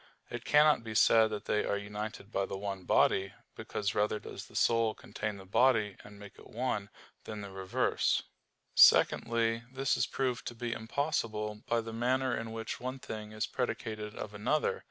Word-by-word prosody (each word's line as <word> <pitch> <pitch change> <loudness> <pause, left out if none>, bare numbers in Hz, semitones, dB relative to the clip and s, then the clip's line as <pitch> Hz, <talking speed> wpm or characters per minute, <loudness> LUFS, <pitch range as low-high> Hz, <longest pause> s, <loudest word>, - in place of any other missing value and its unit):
It - - -6
cannot 150 -4 +5
be 110 -1 -6
said 110 0 +6
that 105 -1 -5
they 105 - +1
are 100 - 0
united 105 0 -6
by 100 -2 0
the 95 - -4
one 95 -2 -5
body; 95 0 +3 0.2
because 105 0 -3
rather 105 +1 +1
does - - -9
the - - -18
soul 115 -2 +3
contain 105 -1 -5
the 95 - -11
body 110 -1 +3
and 105 0 -13
make 100 -1 -12
it - - -14
one, 110 -4 -2 0.4
than 105 -1 -6
the 100 -1 -8
reverse. 95 -1 0 0.5
Secondly, 115 -1 +5
this 135 0 +1
is - - +1
proved 125 -3 -2
to 120 - -5
be 120 0 -3
impossible 110 -4 -2
by 115 0 +2
the 115 0 -7
manner 130 +2 +1
in 115 0 -5
which 115 0 -5
one 130 +2 -4
thing 110 -4 -7
is 110 +1 -2
predicated 110 -4 -4
of 105 - -6
another. 110 +9 0
110 Hz, 180 wpm, -32 LUFS, 105-120 Hz, 0.5 s, said